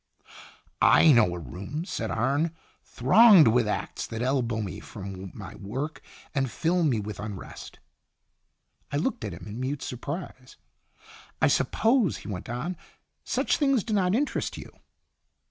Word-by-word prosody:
'" - - -31 0.2
"I 160 - +7
know 105 -9 +4
a - - -5
room," 95 - -6
said 115 - -3
Arne, 140 +8 0 0.2
" - - -39
thronged 180 - +7
with 120 -1 +2
acts 105 - -3
that 115 +1 -4
elbow 125 -4 0
me 100 -4 -4
from 95 -2 -8
my 95 -3 -8
work 130 +10 -5 0.3
and 135 -3 0
fill 170 +8 0
me 130 -8 +2
with 105 0 -6
unrest." 100 -3 -8 1.1
I 145 - 0
looked 190 - -1
at 105 - -3
him 85 - -10
in 105 +3 -7
mute 135 +2 -3
surprise. 130 0 -7 0.4
" - - -28 0.3
I - - +4
suppose," 225 - +2
he - - -11
went 100 -1 -6
on, 135 +10 -3 0.3
" - - -51
such - - +2
things 275 -7 +2
do 220 - -3
not 190 -1 +2
interest 285 +5 -1
you." - - -9
130 Hz, 160 wpm, -27 LUFS, 105-170 Hz, 1.1 s, I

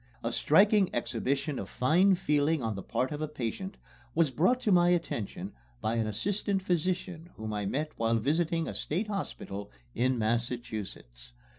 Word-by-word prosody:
A - - -1
striking 200 +4 +4
exhibition 130 +5 -1
of - - -6
fine 180 +9 +4
feeling 150 -3 +1
on 110 -1 -1
the 100 - -5
part 130 +8 -1
of 150 0 -4
a 155 - -1
patient 150 - -4 0.4
was 160 -4 +3
brought 185 - +3
to 210 - +1
my 175 -1 +5
attention 110 - -1 0.3
by 110 +2 -1
an 110 -1 +1
assistant 195 - -1
physician 175 -1 -1
whom 110 0 -5
I 105 -2 -2
met 150 +8 -1
while 115 0 +2
visiting 160 +7 +1
a - - -4
State 195 +8 -2
Hospital 105 - -4 0.2
in 130 +1 +1
Massachusetts. 110 - -3
145 Hz, 160 wpm, -30 LUFS, 115-175 Hz, 0.4 s, my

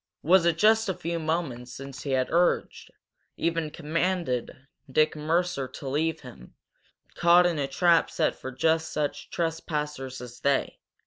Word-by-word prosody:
Was 175 +1 +5
it 170 -1 +2
just 220 +2 +4
a 190 - -1
few 170 +1 -3
moments 155 -7 -3
since 135 0 -8
he 145 - -6
had 130 -1 0
urged, 175 +1 +1 0.5
even 165 -1 -1
commanded, 155 -5 -2 0.3
Dick 155 +3 +3
Mercer 160 -1 0
to 135 - -9
leave 155 +4 -1
him, 120 - -13 0.6
caught 175 +1 +5
in 170 -4 +1
a 140 - 0
trap 170 +4 +3
set - - 0
for 130 - -8
just 160 +5 +1
such 150 -1 -3
trespassers 150 -5 -3
as 120 -1 -10
they? 140 -1 0
160 Hz, 150 wpm, -27 LUFS, 135-170 Hz, 0.6 s, Was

